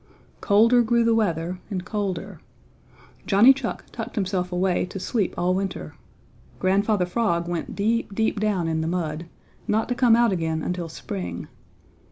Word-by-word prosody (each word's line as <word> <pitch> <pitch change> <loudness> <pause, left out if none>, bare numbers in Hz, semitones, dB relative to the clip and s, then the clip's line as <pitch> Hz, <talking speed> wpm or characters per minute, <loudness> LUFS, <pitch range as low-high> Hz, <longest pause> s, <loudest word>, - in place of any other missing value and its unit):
Colder 230 +4 +5
grew 235 0 +2
the 230 0 +3
weather 180 -5 0
and 185 -3 -4
colder. 195 -4 -3 0.9
Johnny 220 +7 +7
Chuck 265 -3 -5
tucked 230 +1 -6
himself 185 -3 -1
away 180 0 +1
to 195 - -7
sleep 205 0 -1
all 180 +1 +1
winter. 195 +1 -3 0.6
Grandfather 195 +1 +2
Frog 175 -3 0
went 175 -1 -4
deep, 215 0 0
deep 220 -1 0
down 200 -5 0
in 160 -1 0
the 160 - -2
mud, 165 -2 -3 0.4
not 220 +1 +1
to - - +2
come 240 -2 +4
out 235 -2 +4
again 160 -3 -1
until 180 -2 -3
spring. 90 - -6
195 Hz, 155 wpm, -24 LUFS, 175-225 Hz, 0.9 s, Johnny